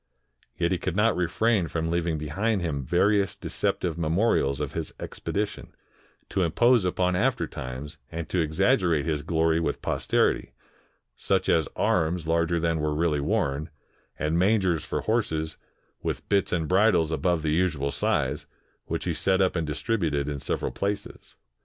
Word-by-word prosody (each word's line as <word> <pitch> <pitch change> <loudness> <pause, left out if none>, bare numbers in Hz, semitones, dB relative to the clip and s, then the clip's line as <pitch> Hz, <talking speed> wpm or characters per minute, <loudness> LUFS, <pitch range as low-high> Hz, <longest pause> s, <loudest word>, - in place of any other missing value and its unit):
Yet 85 0 +1
he 90 - +1
could 95 - -3
not 105 +2 +3
refrain 90 +2 +1
from 80 0 -2
leaving 85 -2 0
behind 95 +7 -1
him 70 -5 -2
various 100 - +2
deceptive 85 -2 -2
memorials 80 - +1
of 75 -3 -3
his - - -5
expedition, 105 +1 -4 0.5
to 95 - 0
impose 115 +6 +3
upon 90 0 +1
after - - +1
times, 65 +4 -7
and 85 0 -4
to 90 - 0
exaggerate 80 - +2
his 75 -3 -1
glory 80 0 +1
with 85 - -2
posterity, - - +1 0.6
such - - 0
as 80 -3 +3
arms 80 +1 +1
larger 85 +1 +1
than 80 -1 0
were 75 0 0
really 75 -2 +1
worn, 70 +2 -1 0.5
and 80 +2 0
mangers 95 -4 +2
for - - -3
horses, 80 -9 -1 0.4
with - - -4
bits 100 -1 +2
of 80 -3 0
bridles 95 -4 +3
above 80 +1 0
the 75 -1 +1
usual 80 -5 +1
size, - - -1 0.4
which - - -3
he - - 0
set 95 -1 +1
up 95 -1 +2
and 80 -3 -1
distributed 75 -3 -1
in 70 -1 -3
several - - -2
places. 100 +1 -4
85 Hz, 155 wpm, -26 LUFS, 75-95 Hz, 0.6 s, not